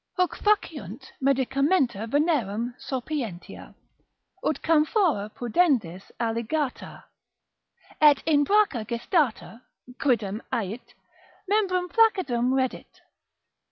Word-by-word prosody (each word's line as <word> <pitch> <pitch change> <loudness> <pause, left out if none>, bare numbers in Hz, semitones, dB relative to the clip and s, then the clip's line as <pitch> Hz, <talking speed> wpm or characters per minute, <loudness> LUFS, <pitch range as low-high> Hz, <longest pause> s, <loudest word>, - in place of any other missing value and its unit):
Huc 365 -1 +1
faciunt 325 -9 -1
medicamenta 270 - +1
venerem 245 - 0
sopientia, 250 - -6 0.7
ut - - 0
camphora 310 - +2
pudendis 235 - 0
alligata, 235 +5 -3 1.0
et 295 -2 +6
in 295 -2 +3
bracha 400 - +2
gestata 235 - -1 0.4
(quidam 220 -6 0
ait) 220 +2 -4 0.5
membrum 370 -3 +1
flaccidum 355 - +2
reddit. 260 -1 -2
270 Hz, 80 wpm, -25 LUFS, 230-330 Hz, 1.0 s, et